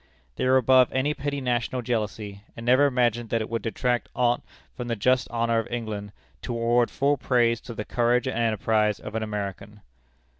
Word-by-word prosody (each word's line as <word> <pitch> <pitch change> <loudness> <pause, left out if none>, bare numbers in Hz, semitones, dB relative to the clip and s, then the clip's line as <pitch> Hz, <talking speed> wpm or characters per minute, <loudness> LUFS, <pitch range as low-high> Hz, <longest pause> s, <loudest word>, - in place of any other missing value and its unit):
They - - -1
were 130 +1 +5
above 130 0 +5
any 135 +3 +1
petty 140 -1 -3
national 125 0 -1
jealousy, 105 -4 -3 0.2
and 115 - -7
never 130 +4 +5
imagined 120 -3 0
that 115 - 0
it 110 - -4
would 115 -1 -1
detract 120 +2 -1
aught 120 -1 +2 0.3
from 125 - -5
the 115 - -1
just 125 +4 +2
honor 115 -1 +1
of 115 - -4
England, 110 -4 -4 0.3
to 120 - -4
award 120 +1 +2
full 140 +1 +1
praise 120 -3 +2
to 120 - -9
the 105 - -4
courage 120 +1 +1
and 130 - -2
enterprise 110 -2 +1
of 105 - -8
an 110 - -2
American. 105 0 -5
120 Hz, 190 wpm, -25 LUFS, 110-125 Hz, 0.3 s, were